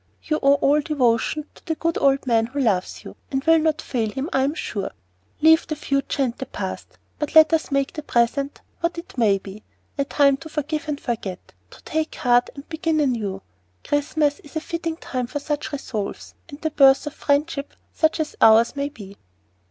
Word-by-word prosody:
You 305 -1 -1
owe 280 0 +5
all 285 +1 +3
devotion 290 0 +1
to - - -19
the 320 - -2
good 330 +1 -1
old 275 -1 +3
man 230 -2 +2
who 275 +4 -5
loves 205 -9 0
you, - - -10
and 270 -1 -2
will 325 +1 +5
not 310 -1 0
fail 230 -4 -1
him, 270 - -4
I 265 - +3
am 280 +4 0
sure. 200 -9 -3 0.5
Leave 320 +1 +5
the 310 - -2
future 275 -1 -1
and 245 -2 -1
the 265 - -5
past, - - -6 0.2
but 300 - -3
let 315 +1 +8
us 320 - +1
make 275 -1 0
the 305 - -5
present 275 +2 0 0.2
what 340 0 -1
it 335 - -9
may 215 -6 +3
be 195 +2 -10 0.4
a 280 - +2
time 280 -1 +3
to 280 +3 -10
forgive 305 +1 -3
and 295 -2 -2
forget, 210 -7 -5 0.2
to - - -16
take 315 0 -2
heart 245 0 +3
and 280 0 -10
begin 320 -1 -1
anew. 220 -9 -1 0.4
Christmas 290 0 0
is 295 - -16
a - - +1
fitting 335 -1 -4
time 250 -6 -4
for 290 - -4
such 295 +1 -3
resolves, 235 -8 -5 0.2
and 285 -1 -10
the 315 - -1
birth 270 -1 +5
of 295 - -5
friendship 285 0 -1 0.2
such 315 +1 +1
as 310 -1 -2
ours 225 +3 +6
may 280 0 -2
be." 200 -8 -12
280 Hz, 200 wpm, -23 LUFS, 245-310 Hz, 0.5 s, let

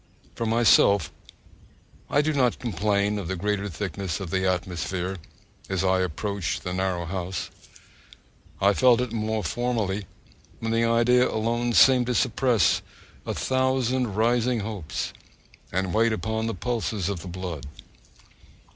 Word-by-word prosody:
For 115 - -3
myself, 110 -3 +4 1.0
I 145 - +3
do 155 +1 0
not 125 -4 +2
complain 105 -1 0
of 95 - -5
the 95 - -2
greater 100 +2 -1
thickness 95 +1 -4
of 95 -4 -6
the 95 0 +1
atmosphere 90 +1 -2 0.5
as 95 -1 0
I 95 0 +3
approach 95 +1 -2
the 90 - -4
narrow 90 -2 -1
house. 90 0 -4 1.1
I 100 +1 +4
felt 125 +1 +5
it 125 -2 -2
more 110 -1 -1
formerly,(2) 105 0 -1 0.5
when 115 0 -2
the 115 0 +2
idea 120 +2 +4
alone 120 +2 0
seemed 125 0 +6
to 125 - 0
suppress 120 -9 +2 0.5
a - - -2
thousand 130 -3 0
rising 120 +1 +2
hopes, 100 -7 -4 0.6
and 95 0 -1
weighed 115 +1 +3
upon 110 +1 -2
the 115 - -2
pulses 110 -3 -2
of 100 -3 -2
the 95 - -9
blood. 90 -5 -6
105 Hz, 140 wpm, -25 LUFS, 95-120 Hz, 1.1 s, seemed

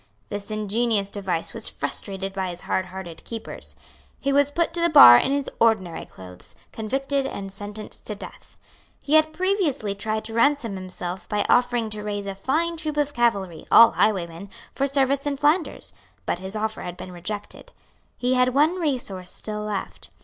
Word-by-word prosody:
This 205 0 -6
ingenious 215 -1 0
device 190 -5 -3
was - - -3
frustrated 195 -1 -3
by 190 -2 -2
his 175 0 -7
hardhearted 185 -3 -4
keepers. 225 -1 -8 0.4
He 275 0 0
was 285 0 +4
put 330 +3 0
to 340 - -1
the 340 - +4
bar 205 - +11
in 195 - +3
his 280 -1 0
ordinary 215 -7 +1
clothes, 90 -1 -12 0.2
convicted 270 +5 -1
and 195 -5 -6
sentenced 205 +2 -6
to 210 - -3
death. - - -12 0.4
He 295 - -3
had 315 0 +5
previously 350 - 0
tried 215 +2 -3
to 225 - -5
ransom 235 -1 +2
himself 185 -1 -6
by 210 0 0
offering 245 -3 +2
to 210 0 -4
raise 205 -1 -4
a 195 - -4
fine 320 +12 -1
troop 310 -2 -4
of 290 -1 0
cavalry, 200 - 0
all 230 0 +9
highwaymen, 185 -2 0 0.2
for 275 - 0
service 275 0 +1
in 285 -1 -1
Flanders; 300 +5 0 0.3
but - - -1
his 190 +3 -7
offer 220 0 -2
had 180 0 -6
been 185 - -8
rejected. 205 - -7 0.5
He 250 +1 +1
had 255 0 +2
one 315 +6 +3
resource 240 - -2
still 210 -1 -4
left. 210 -2 -5
215 Hz, 170 wpm, -24 LUFS, 195-275 Hz, 0.5 s, bar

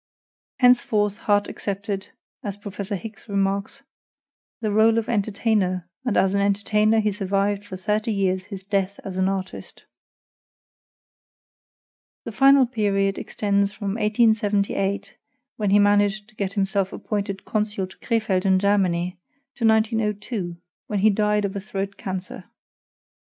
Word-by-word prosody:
Henceforth 215 -4 +3
Harte 205 -1 +3
accepted, 200 0 -4 0.4
as 200 -2 -4
Prof. 205 -1 -9
Hicks 210 +2 -6
remarks, 200 +6 -1 0.8
"the 215 -3 -1
role 220 +2 +4
of 225 - 0
entertainer, 200 -4 0 0.2
and 245 -5 0
as 190 0 +3
an 200 - +2
entertainer 210 +2 +2
he 215 -1 +1
survived 200 0 -1
for 190 -2 -8
thirty 210 +4 -1
years 190 -2 0
his 195 -2 -8
death 195 0 -1
as 185 -1 -5
an 190 0 +2
artist." 190 -1 -6 2.4
The 230 - -6
final 275 +3 +6
period 200 -5 0
extends 200 -1 0
from 205 -1 -5
1878, 210 -2 +1 0.4
when 210 -2 0
he 200 - +5
managed 205 +1 +3
to 215 - -21
get 200 -2 -3
himself 195 -1 0
appointed 200 -2 -4
consul 210 -2 -1
to 185 - -15
Crefeld 215 -6 0
in 190 -1 +4
Germany, 185 -3 +1 0.3
to 230 - +1
1902, 215 -4 0 0.3
when 210 - -2
he 210 +2 +4
died 210 0 +1
of 200 0 -4
a - - -2
throat 195 0 -4
cancer. 185 -1 -6
205 Hz, 135 wpm, -23 LUFS, 195-215 Hz, 2.4 s, final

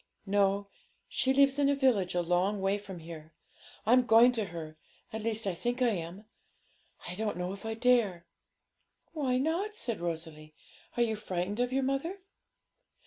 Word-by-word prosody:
No; 200 0 +2 0.4
she 265 - +1
lives 275 +1 +4
in 280 -1 +4
a 285 - +3
village 235 -10 +2
a 175 - +1
long 180 +4 +1
way 195 +1 +1
from 195 -3 -9
here. 160 -1 -10 0.5
I'm 250 +4 +5
going 230 +3 +7
to 225 -4 -2
her; 165 -4 -7 0.4
at 220 - -3
least 225 0 -1
I 195 - 0
think 240 +8 -2
I 250 -2 +4
am; 180 +2 -5 0.8
I 175 - -5
don't 210 -1 -2
know 180 +1 -3
if 200 +2 -10
I 225 - -2
dare.' 225 -8 +2 0.9
'Why 270 -5 0
not?' 340 +10 -1
said 235 - -1
Rosalie. 160 -2 -5 0.4
'Are 240 - +4
you 220 -2 0
frightened 200 0 -3
of 245 0 +1
your 270 +1 +1
mother?' 275 +8 -1
210 Hz, 170 wpm, -30 LUFS, 180-250 Hz, 0.9 s, going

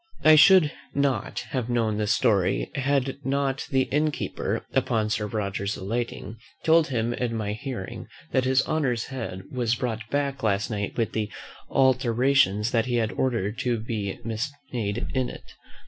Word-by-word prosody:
I 155 - +8
should 155 -1 +7 0.2
not 140 -6 0
have 125 -3 -2
known 115 -3 +1
this 105 -1 0
story 95 - +2
had 135 -1 0
not 135 0 -1
the 135 -3 +3
inn 150 +3 +1
keeper, 150 - -3
upon 110 -2 +1
Sir 105 -1 0
Roger's 100 -1 -2
alighting, 115 +2 -4 0.3
told 165 0 +5
him 120 -3 -1
in 120 -1 -2
my 105 -2 -2
hearing, 115 -4 -6 0.2
that 130 - +2
his 130 0 +3
honour's 130 -7 0
head 115 -8 -6
was 120 -2 0
brought 110 -3 -4
back 140 -1 -1
last 105 -1 0
night 100 -1 -3
with 115 -2 0
the 105 -2 -2 0.4
alterations 125 -4 +3
that 115 0 +1
he 120 - 0
had 115 -2 +1
ordered 115 -5 -1
to 120 -2 0
be 105 -3 -4 0.5
made 110 -2 -2
in 130 -2 0
it. - - -11
120 Hz, 160 wpm, -26 LUFS, 110-135 Hz, 0.5 s, I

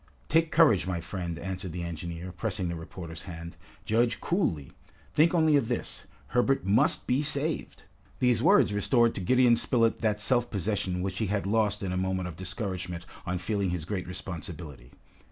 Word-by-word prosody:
"Take 165 +1 +3
courage, 145 - +5
my 90 -2 -1
friend," 85 0 -5
answered 95 +2 -5
the 85 -1 -4
engineer, 85 +1 -5
pressing 95 0 -2
the 85 - -3
reporter's 85 0 -8
hand. 85 -2 -8 0.3
"Judge 115 +1 +2
coolly. 85 - -1 0.4
Think 165 +4 +4
only 160 -2 +4
of 130 -5 0
this: - - -4 0.2
Herbert 125 - +2
must 100 +3 +3
be 130 +3 +2
saved!" 150 +1 -1 0.3
These 125 -2 +2
words - - +5
restored 115 +3 +3
to - - -5
Gideon 125 +5 +4
Spilett 115 -1 +1
that 105 -2 +1
self 120 +2 +1
possession 95 -3 -1
which 95 0 -3
he 110 - 0
had 100 0 -1
lost 105 0 +1
in 95 - -2
a 90 - -1
moment 95 0 -1
of 80 - -9
discouragement 90 -2 -4 0.2
on 90 +1 -1
feeling 100 +1 -1
his 90 -3 -3
great 95 0 -3
responsibility. 80 -7 -7
95 Hz, 170 wpm, -28 LUFS, 90-115 Hz, 0.4 s, courage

